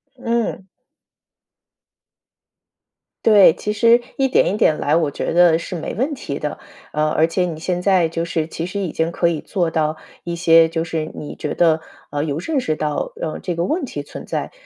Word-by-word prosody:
嗯。 230 -6 -2 2.6
对， 205 -6 +8
其 210 - -3
实 230 +3 +5 0.2
一 270 - +3
点 255 - +2
一 - - -2
点 155 -7 +3
来， 150 - +1
我 160 -3 +2
觉 - - -3
得 170 -1 +5
是 170 +2 -6
没 165 - -4
问 265 +8 -1
题 140 - -5
的。 150 - -4 0.3
呃， 155 0 +1
而 155 - +3
且 180 +2 0
你 165 -3 -5
现 180 +2 -2
在 185 -3 +3
就 165 +1 -3
是 165 -2 -2
其 165 0 -5
实 185 +3 -4
已 185 -5 -2
经 165 +1 -1
可 170 - +1
以 165 -3 -1
做 175 -3 -1
到 155 -1 0 0.3
一 170 0 -4
些 165 -1 +5
就 165 0 -1
是 160 -2 -3
你 150 - -7
觉 150 - -4
得， 160 -2 +3 0.3
呃， 145 0 -1
有 145 -2 -2
认 290 - -1
识 155 -11 -1
到， 150 -1 -2
嗯， 155 -1 -3
这 175 - -3
个 170 +1 -1
问 320 - -1
题 145 - -6
存 - - -9
在。 - - -3
170 Hz, 215 characters per minute, -20 LUFS, 155-190 Hz, 2.6 s, 对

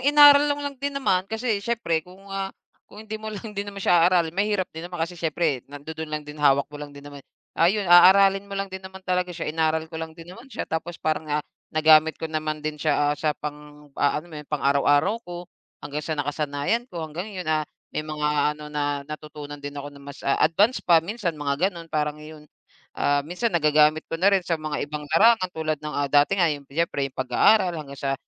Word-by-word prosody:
inaaral 290 +1 +7
lang 285 0 -2
din 280 0 -2
naman, 190 -8 +1
kasi 225 -2 -1
siyempre 205 -8 -1
kung, 185 +4 -17
ah, 195 0 -2 0.4
kung 210 +2 -12
hindi 220 0 -6
mo 220 - -6
lang 215 0 -7
din 200 0 -4
naman 200 - -9
siya 175 0 +5
aaralin 170 -3 +2
mahirap 200 0 0
din 165 +2 -7
naman. 180 - -7
Kasi 175 +1 -11
siyempre 160 -4 0
nandudun 155 +2 -7
lang 150 -1 -4
din, 150 0 -10
hawak 140 -1 +4
mo 145 - -8
lang 145 -1 -9
din 140 - -12
naman. 145 -1 -10 0.3
Ayun, 195 +5 +2
aaralin 195 +3 +6
mo 200 - -5
lang 195 -1 -4
din 190 - -5
naman 190 0 -11
talaga 180 0 0
siya, 160 - -3
inaaral 160 0 +1
ko 160 - -5
lang 160 0 -7
din 170 +1 -11
naman 235 +6 -13
siya, - - -4
tapos 160 +1 -4
parang, 155 0 -2
ah, 150 0 -1 0.2
nagamit 155 0 +5
ko - - -6
naman 155 -1 -3
din 150 -1 -4
siya, 145 -1 +2
ah, - - -2
sa 155 -1 0
pang, 150 -1 -9
ah, 145 - +3
alam 160 +2 -7
mo 150 - -6
yun, 150 - -16
pang-araw-araw 145 +8 +2
ko, 175 -3 -8 0.4
hanggang 145 +1 -4
sa 155 +1 -4
nakasanayan 145 - -1
ko, 170 -6 -5
hanggang 165 +6 -6
yun, 180 - -4
ah, 155 -1 0 0.2
may - - -1
mga 155 -1 -2 0.3
ano 150 - -10
na 145 -1 -1
natutunan 150 -1 -8
din 145 0 -7
ako 145 0 -6
na 140 - -14
mas, 140 0 -11
ah, 140 - +1
advance 210 +9 +3
pa, 165 -2 +4
minsan 200 -3 -2
mga 145 +5 0
ganun. 170 -4 -10
Parang 150 -1 -2
iyon, 155 0 -11 0.5
ah, 145 0 +1
minsan 180 +9 -1
nagagamit 155 -1 +3
ko 165 - -5
na 195 - +5
rin 190 -3 +2
sa 165 -2 -1
mga 150 -2 -3
ibang 150 0 -6
larangan 220 -1 +5
tulad 155 -1 -2
ng, 150 0 -6
ah, 145 - +1
dati 145 +7 +4
nga 175 -3 +3
yung 145 -1 -8
siyempre 140 -3 -1
yung - - -27
pag-aaral, 175 - +3
hanggang 145 -4 -7
sa 135 -1 -1
160 Hz, 225 wpm, -24 LUFS, 150-190 Hz, 0.5 s, inaaral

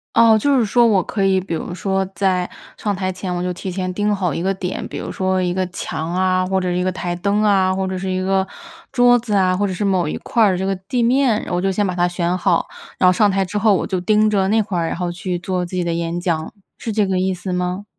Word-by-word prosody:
哦， 225 -1 +6
就 280 +5 +2
是 245 - +3
说 235 +3 +4
我 200 -4 +3
可 195 +2 -2
以， 190 -1 +3
比 185 -2 -5
如 175 - -5
说 190 0 -1
在 185 -2 +1 0.3
上 205 -2 -2
台 185 0 -2
前， 185 -1 -4
我 175 - -2
就 180 0 -1
提 180 - -7
前 185 0 -3
盯 205 +2 0
好 185 -5 -1
一 - - -3
个 190 +3 0
点， 185 -1 -4
比 - - -8
如 - - -5
说 185 0 0
一 180 -1 0
个 185 0 -1
墙 165 -3 -4
啊， 185 0 +1
或 190 0 0
者 185 - -2
是 180 0 0
一 180 - 0
个 185 - 0
台 175 -1 -3
灯 200 +4 0
啊， 190 -3 +3
或 190 0 -1
者 185 0 -3
是 190 0 -4
一 185 0 -1
个 190 0 +1 0.5
桌 245 -1 +5
子 225 -3 -3
啊， 185 -2 +3
或 205 +2 +1
者 190 - -3
是 205 - -2
某 185 -3 +1
一 150 - -3
块 230 -2 +1
儿 190 -3 +3
这 185 - -2
个 195 - 0
地 235 +7 -2
面， 245 -2 +2
我 175 0 0
就 195 0 0
先 205 +2 0
把 180 -2 -2
它 175 - +3
选 175 0 -1
好。 - - +1 0.3
然 185 - +4
后 - - +6
上 210 +3 +3
台 195 0 +1
之 200 +3 -3
后 215 -2 +4
我 - - 0
就 185 - -2
盯 215 +3 +3
着 195 -2 +2
那 220 +2 +3
块 195 -4 -3
儿， 165 - 0
然 - - -3
后 175 -1 -2
去 180 +1 -3
做 180 0 -2
自 180 - -9
己 180 - 0
的 170 - -1
演 170 +1 -2
讲， 165 -3 -2 0.3
是 225 - -4
这 210 0 +2
个 185 - +1
意 185 0 0
思 180 +1 -5
吗？ 180 +2 -2
185 Hz, 305 characters per minute, -20 LUFS, 180-205 Hz, 0.5 s, 哦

